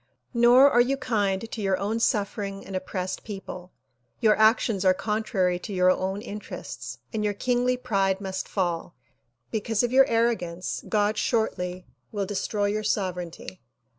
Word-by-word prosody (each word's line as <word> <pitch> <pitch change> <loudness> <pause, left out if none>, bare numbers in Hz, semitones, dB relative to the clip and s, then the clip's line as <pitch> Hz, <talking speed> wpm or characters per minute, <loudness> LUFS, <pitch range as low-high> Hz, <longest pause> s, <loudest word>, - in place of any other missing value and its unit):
Nor 240 +3 +7
are 240 - +5
you 265 +3 +1
kind 210 -4 -1
to 220 - -4
your 195 -2 +1
own 210 +4 -1
suffering 200 -3 -1
and 195 - -7
oppressed 185 0 -4
people. 190 -3 -8 0.5
Your 220 -3 +4
actions 220 -2 +3
are 185 -1 +5
contrary 195 -3 0
to 200 - -7
your 185 0 +4
own 190 +3 -2
interests 210 -3 -7 0.2
and 215 -1 -1
your 205 -1 0
kingly 250 +2 +1
pride 195 -6 0
must 190 -1 -4
fall. 175 -3 -2 0.6
Because 220 0 0
of 240 - 0
your 265 +1 +6
arrogance 225 -8 -1
God 210 0 +1
shortly 185 -6 -1 0.3
will 205 -2 -2
destroy 205 +1 -1
your 210 +1 0
sovereignty. 185 -3 -3
205 Hz, 150 wpm, -26 LUFS, 185-225 Hz, 0.6 s, Nor